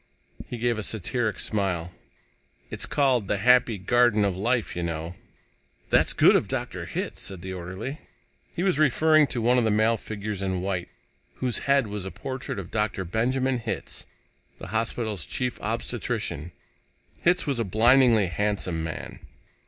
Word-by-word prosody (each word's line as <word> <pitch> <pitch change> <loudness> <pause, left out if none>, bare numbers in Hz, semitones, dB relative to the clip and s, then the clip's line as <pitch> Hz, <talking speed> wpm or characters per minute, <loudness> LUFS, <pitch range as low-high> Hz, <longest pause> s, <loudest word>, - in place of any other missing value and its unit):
He 120 - -5
gave 120 -1 0
a - - -3
satiric 110 +1 -1
smile. 95 -5 -1 0.8
"It's - - -3
called 130 -7 +2
'The 100 - +1
Happy 125 +1 +4
Garden 115 +2 +3
of 95 -2 0
Life,' 115 +5 0
you 90 - -2
know." 85 0 -3 0.8
"That's - - +4
good - - +6
of - - +2
Dr. - - -4
Hitz," - - -4
said 95 -3 -6
the 95 0 -5
orderly. 95 - -6 0.6
He 175 - -1
was 185 -6 +2
referring 155 +1 +4
to 120 -4 -3
one 125 +2 +4
of - - +1
the 110 - +2
male 110 +2 +3
figures 105 -2 -5
in 95 -2 -1
white, 95 -2 -2 0.5
whose 125 -4 -1
head 140 -2 +4
was 105 -2 -5
a - - -3
portrait 130 +2 -5
of 95 -3 -6
Dr. 105 -3 -1
Benjamin 125 +7 0
Hitz, 115 -1 -5 0.5
the - - -9
hospital's 110 -4 -1
Chief 125 - -3
Obstetrician. 80 +5 -3 0.7
Hitz 180 +1 +3
was 140 -5 -1
a - - +2
blindingly 115 +2 +5
handsome 90 -2 -1
man. 80 -1 -6
110 Hz, 160 wpm, -26 LUFS, 95-125 Hz, 0.8 s, good